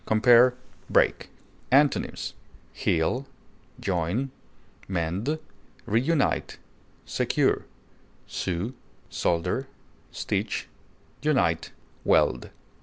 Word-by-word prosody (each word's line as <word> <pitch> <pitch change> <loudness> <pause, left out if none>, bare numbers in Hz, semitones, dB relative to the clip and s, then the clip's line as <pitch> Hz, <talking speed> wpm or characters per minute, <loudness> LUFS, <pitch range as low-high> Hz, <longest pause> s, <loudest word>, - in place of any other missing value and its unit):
Compare 120 +3 +6 0.3
BREAK. - - +2 0.4
Antonyms: 140 +1 +2 0.4
heal, 125 +12 0 1.6
mend, 95 - -1 0.5
reunite, 135 +8 +1 0.5
secure, - - +1 0.6
sew, 95 +7 -3 0.4
solder, 90 +10 0 0.4
stitch, - - -2 0.5
unite, 85 - +1 0.3
weld. 60 - +3
115 Hz, 55 wpm, -26 LUFS, 85-135 Hz, 1.6 s, Compare